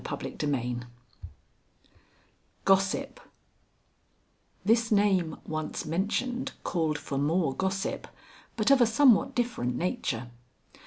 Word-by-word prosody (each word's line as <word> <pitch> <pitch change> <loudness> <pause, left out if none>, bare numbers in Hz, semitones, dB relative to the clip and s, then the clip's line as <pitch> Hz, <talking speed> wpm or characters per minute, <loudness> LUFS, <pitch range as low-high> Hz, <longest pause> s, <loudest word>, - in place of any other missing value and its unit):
XIII 125 -5 -3 1.9
GOSSIP 195 - +2 1.5
This 225 +1 +3
name 195 -6 +2
once 155 0 -4
mentioned 245 - -1
called 160 -4 0
for 145 -1 -4
more 155 0 +1
gossip, 190 +4 -2 0.5
but 220 +4 +2
of 275 -2 +6
a 240 - +6
somewhat 260 +2 +4
different 235 - -1
nature. 130 - -2
190 Hz, 90 wpm, -28 LUFS, 150-230 Hz, 1.9 s, of